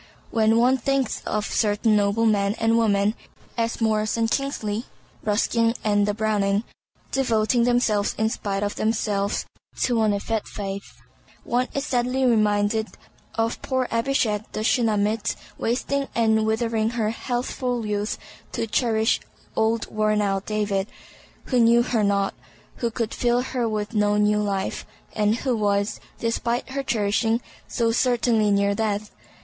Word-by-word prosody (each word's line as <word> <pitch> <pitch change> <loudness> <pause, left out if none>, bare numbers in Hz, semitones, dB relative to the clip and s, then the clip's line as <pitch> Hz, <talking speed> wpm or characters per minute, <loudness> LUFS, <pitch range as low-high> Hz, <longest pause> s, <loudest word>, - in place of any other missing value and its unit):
When 225 0 +3
one 250 +3 +4
thinks 275 0 0
of 210 0 -1
certain 215 0 +2
noble 205 +2 +2
men 205 -1 +2
and 225 0 +2
women—as 225 +1 -1
Maurice 215 -1 +1
and 225 0 +1
Kingsley, 230 -5 -1 0.4
Ruskin 230 +2 +1
and 205 -1 +2
the 205 - 0
Browning—devoting 215 +3 0
themselves 235 -4 +2
in 220 - +2
spite 200 -2 -2
of 205 - -3
themselves 210 -2 0 0.4
to 240 -3 +2
an 215 -1 +3
effete 205 +2 -2
faith, 195 -1 -7 0.4
one 250 +1 0
is 275 0 -1
sadly 250 +1 +1
reminded 215 -1 +2 0.5
of 225 +1 -1
poor 260 -2 -1
Abishag 230 -3 +1
the 215 - -2
Shunammite 220 -2 +1 0.2
wasting 275 +4 -1
and 220 -1 +3
withering 225 0 +1
her 215 -2 +1
healthful 245 0 -2
youth 210 0 -1 0.4
to - - -1
cherish 225 0 +1 0.4
old 225 +1 +1
worn 215 0 +1
out 195 -1 0
David, 205 -2 0 0.6
"who 255 - +1
knew 235 +1 +5
her 235 -3 0
not," 200 -1 +1 0.4
who 235 - -1
could 230 -1 -3
fill 245 0 +2
her 250 -2 -2
with 210 0 -3
no 210 -1 +2
new 210 0 +3
life, 195 -2 -2 0.3
and 210 0 +2
who 255 0 -1
was, 205 -1 0 0.2
despite 235 +2 -1
her 275 +1 -2
cherishing, 225 -1 +1 0.3
so 230 -1 0
certainly 235 -3 +2
near 200 0 +2
death. 210 0 -2
220 Hz, 140 wpm, -24 LUFS, 210-235 Hz, 0.6 s, knew